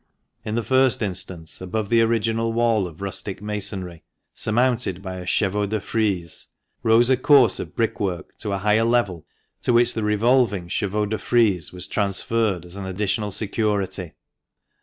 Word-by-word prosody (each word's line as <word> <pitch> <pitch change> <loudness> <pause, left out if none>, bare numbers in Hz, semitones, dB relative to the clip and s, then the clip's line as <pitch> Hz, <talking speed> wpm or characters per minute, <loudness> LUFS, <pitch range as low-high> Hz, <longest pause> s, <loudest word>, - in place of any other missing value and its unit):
In 110 - -3
the 120 - 0
first 130 -1 +3
instance, 90 -4 -5
above 100 +3 -3
the 115 -1 +4
original 115 0 +1
wall 115 -4 +2
of 85 +1 -13
rustic 100 0 -4
masonry, 100 -4 -3 0.3
surmounted 115 -4 +1
by 95 -1 -5
a 90 0 -8
chevaux 105 +1 +1
de 110 +2 -1
frise, 95 -6 -2 0.3
rose 115 +3 +4
a 130 - +4
course 130 -4 +5
of 85 - -7
brick 115 -1 -1
work 95 -4 -3
to 105 - -4
a 100 - 0
higher 105 +3 +2
level, 115 -9 0 0.3
to - - +1
which 120 0 +4
the 110 - -3
revolving 105 -3 +2
chevaux 105 +4 -1
de 110 +1 -3
frise 105 -9 +2
was 90 0 -6
transferred 100 -1 +1
as 90 +2 -10
an 95 -1 -5
additional 105 +2 -1
security. 100 -4 -2
105 Hz, 160 wpm, -23 LUFS, 95-115 Hz, 0.3 s, course